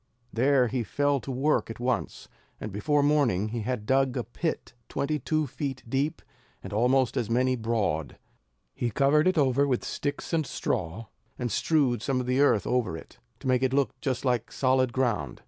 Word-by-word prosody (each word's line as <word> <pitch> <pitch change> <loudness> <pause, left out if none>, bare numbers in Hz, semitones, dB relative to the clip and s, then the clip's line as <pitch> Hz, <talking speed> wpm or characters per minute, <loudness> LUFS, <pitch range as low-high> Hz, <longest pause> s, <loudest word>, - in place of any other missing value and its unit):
There 130 +1 +3
he 120 0 -1
fell 145 +6 +1
to 135 - -9
work 135 +2 +1
at 115 - -7
once, 125 0 -2 0.3
and 110 - -5
before 140 +9 +1
morning 130 -9 +2
he 120 +2 -3
had 110 -1 -3
dug 130 +1 +2
a 125 - -1
pit 160 +8 -4 0.2
twenty 150 +2 -1
two 155 0 0
feet 135 -1 -5
deep, 135 +5 -1 0.4
and - - -7
almost 125 +3 +2
as 120 -5 -1
many 130 +2 +2
broad. 110 - -1 0.6
He 120 - -2
covered 140 - +3
it 185 -1 +2
over 140 -1 +3
with 125 -3 0
sticks 145 +3 -4
and 160 -1 +2
straw, 100 - -3 0.3
and 120 -2 -3
strewed 135 -4 +2
some 130 +2 0
of 125 - -2
the 125 +2 +1
earth 130 -8 +3
over 125 -8 0
them, - - -10 0.4
to - - -5
make 130 -1 +3
it 130 0 +1
look 135 -5 +2
just 130 -1 -2
like 125 -3 0
solid 130 -1 +2
ground. 120 - -1
130 Hz, 185 wpm, -27 LUFS, 115-140 Hz, 0.6 s, There